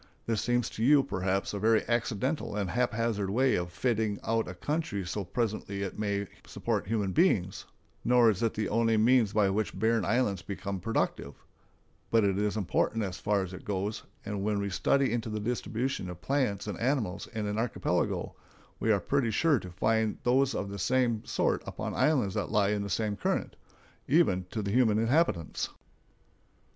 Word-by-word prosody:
This 115 -2 0
seems 120 -1 +1
to 110 - -4
you, 140 +2 +6
perhaps, 95 -5 -1
a 100 - -3
very 110 +2 +3
accidental 120 +1 -1
and 100 -4 -2
haphazard 115 -4 0
way 130 +6 +2
of 90 0 -1
fitting 110 -2 0
out 115 0 0
a 90 - -6
country 145 - -2
so 90 +4 -3
that 95 -4 -7
presently 105 -4 -2
it 95 - -5
may 100 -1 -1 0.2
support - - -2
human 105 -3 0
beings, 95 - +2 0.4
nor 120 -2 +5
is 100 - -4
it 115 -2 0
the 105 - -1
only 115 0 +2
means 115 -1 +4
by 105 -1 +3
which 105 -1 -2
barren 110 +1 +2
islands 100 -2 +1
become 100 +1 -5
productive; 115 +5 -2 0.7
but 115 -1 +4
it 100 -1 +1
is 105 +1 0
important 110 +2 0
as 95 -2 -4
far 100 -2 +1
as 95 0 -7
it 90 - -9
goes, 100 +1 -2 0.2
and 100 -1 -3
when 105 0 0
we 100 -1 -2
study 135 +7 +2
into 115 -1 -2
the 105 0 -3
distribution 120 -1 -2
of 90 -1 -8
plants 125 -3 0
and 105 - -5
animals 120 -7 -1
in 110 -1 -2
an 105 +1 -2
archipelago, 115 0 -1 0.5
we 110 - +2
are 100 - +3
pretty 130 +5 0
sure 145 +5 +3
to 95 - -9
find 110 +4 0
those 130 +2 +3
of 100 -1 -3
the 100 - -6
same 120 +2 +1
sort - - 0
upon - - -4
islands 130 -11 +2
that - - -2
lie 100 -2 +2
in 105 -1 0
the 100 - -4
same 105 +2 -1
current—even 100 - -1
to 110 +1 -3
the 100 - -2
human 115 -2 +3
inhabitants. 115 - +1
110 Hz, 185 wpm, -29 LUFS, 100-120 Hz, 0.7 s, you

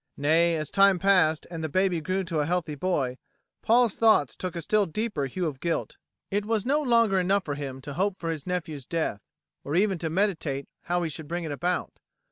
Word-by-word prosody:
Nay, 165 +4 +3
as 155 -2 -4
time 195 -1 +5
passed 175 -5 +3
and 165 -2 -5
the 160 - -2
baby 185 0 +1
grew 185 +4 -1
to 170 -3 -2
a 145 - 0
healthy 175 -3 -1
boy, 140 -5 -1 0.4
Paul's 235 -1 +4
thoughts 215 - +3
took 185 -1 -5
a 170 - -3
still 210 +3 +2
deeper 170 -5 -2
hue 175 +7 -3
of 145 -5 -3
guilt. 170 +2 -2 0.3
It 205 +1 0
was 215 -1 -1
no 290 +4 +2
longer 230 -7 +3
enough 190 +2 +1
for 145 - -2
him 135 -2 -6
to 140 +2 -7
hope 190 +4 0
for 165 -2 -3
his 155 -1 -6
nephew's 160 -7 -4
death, 160 -11 -2 0.4
or 145 - -3
even 190 -1 +2
to 160 - -2
meditate 160 -7 -1 0.2
how 175 0 0
he 165 - -1
should 150 +1 -7
bring 175 +2 -3
it 160 - -4
about. 175 +5 -2
175 Hz, 215 wpm, -27 LUFS, 155-195 Hz, 0.4 s, time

